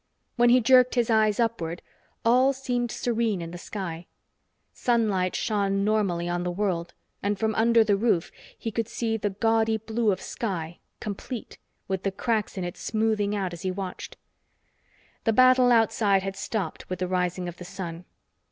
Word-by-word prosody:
When 240 -1 +4
he 250 +1 +6
jerked 255 +1 +5
his 240 -1 +2
eyes 215 -1 +3
upward, 180 -8 -1 0.4
all 255 +4 +5
seemed 250 -2 -2
serene 230 -4 -1
in 165 -1 -6
the 175 - -8
sky. 170 -4 -6 0.7
Sunlight 210 -7 +1
shone 200 -2 0
normally 195 -5 +1
on 175 0 -1
the 180 - -1
world, 175 -3 -2 0.3
and 205 0 0
from 220 +1 0
under 230 +1 +4
the 210 -2 +2
roof 195 -5 +1 0.3
he 225 - -4
could 225 0 -2
see 230 -1 -2
the 210 -1 -1
gaudy 225 +2 +1
blue 220 0 0
of 185 - -2
sky, 175 -8 -4 0.2
complete, 215 +3 -6 0.3
with 190 -1 -2
the 195 - -1
cracks 215 0 -1
in 185 - -2
it 175 0 -5
smoothing 215 -2 0
out 190 -3 -2
as 170 - -8
he 190 - -1
watched. 185 0 -6 1.1
The 225 - +3
battle 255 +1 +6
outside 215 -4 +3
had 195 0 -4
stopped 195 -3 -4
with 185 - -3
the 185 - -2
rising 180 0 -1
of 175 -1 -7
the - - -8
sun. 180 -2 -7
210 Hz, 170 wpm, -26 LUFS, 185-230 Hz, 1.1 s, he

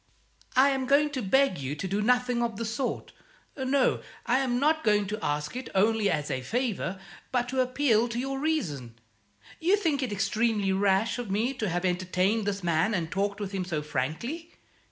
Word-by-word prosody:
"I 265 +2 +6
am 265 -2 -1
going 290 +2 +4
to 265 -3 -3
beg 255 - +2
you 135 +1 -3
to 190 - -4
do 200 +3 -1
nothing 250 +1 +2
of 235 -1 -1
the 230 - -3
sort. 240 +4 -3 0.4
No, 265 -1 +1 0.2
I 250 +2 +3
am 250 -2 0
not 315 +3 +2
going 210 -2 +3
to 210 +2 -5
ask 150 +3 -2
it 255 - -5
only 215 +1 +3
as 150 -2 -1
a 130 - -2
favour, 210 - -2 0.3
but 245 -1 +1
to 260 0 +1
appeal 250 -3 +2
to 235 - -4
your 270 +2 -2
reason. 155 - -2 0.6
You 370 +5 +3
think 320 -8 0
it 255 -4 -2
extremely 210 0 +1
rash 195 +4 +2
of 240 -4 -5
me 220 +7 0
to 225 -6 -2
have 175 +2 -1
entertained 185 +4 +1
this 200 -2 -2
man 170 +5 +2
and 165 -3 -2
talked 200 +1 -1
with 200 -2 -4
him 195 -2 -2
so 160 -4 -3
frankly? 160 - -4
220 Hz, 195 wpm, -28 LUFS, 190-260 Hz, 0.6 s, I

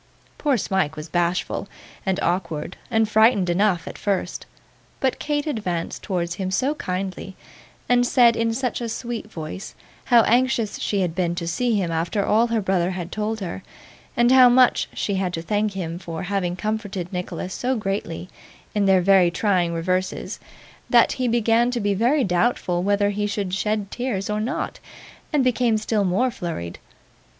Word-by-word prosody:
Poor 285 -4 +2
Smike 190 -7 0
was 155 +1 -7
bashful, 175 +2 -1 0.4
and 190 -1 +1
awkward, 170 -2 -2
and 225 -1 +2
frightened 215 -4 +4
enough, 180 -2 +1
at - - -7
first, 200 -2 -2 0.5
but 265 -1 0
Kate 295 0 -1
advanced 185 - -3
towards 175 -3 -2
him 185 - -1
so 255 +10 +1
kindly, 190 -5 -4 0.5
and 245 0 +4
said, 245 -2 +5
in 230 0 +1
such 250 +1 -2
a 235 - -3
sweet 230 -1 -5
voice, 160 +3 -7 0.3
how 240 -2 +6
anxious 240 -2 +1
she 200 -2 0
had 175 -3 -1
been 175 -1 -1
to 170 -1 -4
see 235 +7 0
him 185 -5 0
after 170 +5 -1
all 225 +3 +3
her 230 -2 0
brother 185 -2 +1
had 180 -2 -5
told 215 0 -2
her, 185 0 -5 0.6
and 240 +1 +4
how 255 -1 +8
much 250 0 +4
she 200 - -1
had 185 -2 -1
to 165 - -3
thank 210 +2 0
him 170 -3 -4
for 165 -3 -6
having 180 -2 -1
comforted 205 -3 -4
Nicholas 180 +1 -4
so 255 +1 -1
greatly 195 -5 -3 0.5
in 205 -2 +1
their 190 -1 +5
very 190 -1 +5
trying 180 -1 +1
reverses, 185 +3 -2 0.5
that - - +5
he 255 -1 -1
began 235 0 +3
to 245 -1 -1
be 205 -2 +1
very 245 +8 +2
doubtful 180 -2 +1
whether 205 +1 +2
he 205 0 -1
should 200 -3 -3
shed 210 0 -1
tears 225 -6 -2
or 210 0 -1
not, 250 +8 -3 0.5
and 295 -4 +2
became 245 -3 +2
still 215 -1 0
more 200 +8 +1
flurried. 125 - -5
200 Hz, 170 wpm, -23 LUFS, 180-230 Hz, 0.6 s, how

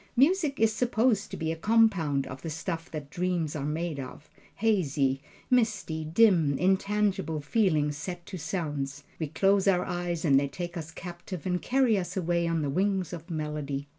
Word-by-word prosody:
Music 295 +2 +3
is 220 -1 +4
supposed 225 -2 +1
to - - -6
be 160 0 -1
a - - -2
compound 175 -8 +3
of 130 +1 -8
the 165 - -5
stuff 165 +1 -4
that 150 -2 -7
dreams 175 -3 -1
are 145 -1 -2
made 160 -1 -2
of 135 +3 -9 0.2
hazy, 150 -11 +1 0.3
misty, 215 -10 +1
dim, 165 -4 +4
intangible 190 -3 +1
feelings 150 -4 +1
set 175 +2 -6
to 195 - -7
sounds 145 -5 -3 0.2
we 160 - -1
close 195 +5 +2
our 180 -2 +3
eyes 175 -1 -2
and 135 -3 +5
they 140 - 0
take 175 +4 -6
us 165 -2 -5
captive 175 0 -8
and 180 -1 0
carry 250 -5 +3
us 180 +1 -5
away 170 -1 +1
on 165 -2 0
the 145 - -1
wings 190 +1 0
of 165 +1 -8
melody. 150 -3 -3
170 Hz, 175 wpm, -28 LUFS, 150-195 Hz, 0.3 s, and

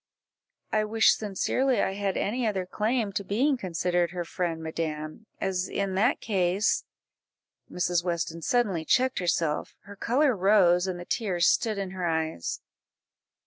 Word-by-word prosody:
"I 215 -1 +2
wish 220 +1 +4
sincerely 235 +5 0
I - - +1
had 195 -1 -2
any 235 +3 -1
other 190 -3 -1
claim 215 +3 -1
to 200 - -2
being 250 +9 +1
considered 175 -4 0
her 175 0 -4
friend, 165 -2 -3
madam, 160 +4 -4
as 185 -1 -1
in 195 -1 -2
that 220 +8 +2
case 190 0 +1 0.4
" - - -32
Mrs. 175 -1 0
Weston 170 -1 -2
suddenly 200 -5 +1
checked 255 +9 +2
herself, 165 -4 -1
her 205 0 -12
colour 255 +5 +2
rose, 185 -2 +4
and 180 -2 -3
the 175 - -8
tears 180 -6 0
stood 220 -3 +2
in 195 -2 -3
her 185 -2 -3
eyes. 160 - -2
190 Hz, 150 wpm, -27 LUFS, 175-215 Hz, 0.4 s, wish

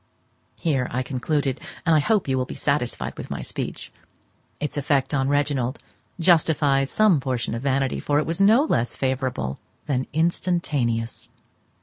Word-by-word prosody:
Here 135 -7 0
I 130 +2 -1
concluded, 135 +1 -1 0.2
and 165 - +4
I - - +5
hope 210 +4 +1
you 135 - +1
will 130 -1 0
be - - -8
satisfied 140 -4 -1
with - - -7
my - - -4
speech. - - -5 0.7
Its 150 - -3
effect 140 -2 +1
on 135 -1 +1
Reginald 140 -2 0 0.4
justifies 150 -5 +3
some 210 -8 +4
portion 125 -4 -2
of 115 - -3
vanity, 135 -1 0
for 145 - 0
it 150 - +2
was 165 +3 -2
no 220 +7 +6
less 120 - 0
favourable 130 - -2 0.3
than 130 -3 -1
instantaneous. 150 -8 -1
140 Hz, 150 wpm, -24 LUFS, 130-155 Hz, 0.7 s, no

